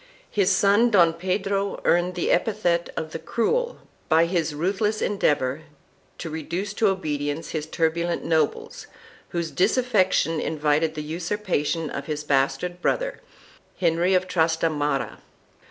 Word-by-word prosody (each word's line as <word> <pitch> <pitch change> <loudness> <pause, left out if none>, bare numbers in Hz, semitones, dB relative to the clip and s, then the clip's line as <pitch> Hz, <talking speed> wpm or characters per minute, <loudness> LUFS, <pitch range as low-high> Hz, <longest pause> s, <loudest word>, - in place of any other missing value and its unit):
2 205 - +2
His 185 - +3
son, 205 +4 +4
Don 175 -6 +5
Pedro, 195 +3 -1
earned 175 +1 +2
the 175 - 0
epithet 175 -3 +1
of 160 -1 -3
the 165 - -5
Cruel 240 - -1 0.3
by 165 +1 +5
his 165 -3 -1
ruthless 200 +6 0
endeavor 150 -8 0 0.6
to 165 - -6
reduce 175 +6 -4
to 215 +1 +2
obedience 150 -5 -2
his 155 -1 -3
turbulent 170 +2 -1
nobles, 160 -2 -1 0.4
whose 170 -2 -3
disaffection 190 - +2
invited 155 +1 0
the 150 - -4
usurpation 165 -2 -2
of 140 - -5
his 150 -1 -3
bastard 140 +5 0
brother, - - -1 0.6
Henry 175 +2 +2
of 185 0 +1
Trastamara. 160 -4 0
170 Hz, 130 wpm, -24 LUFS, 155-195 Hz, 0.6 s, Don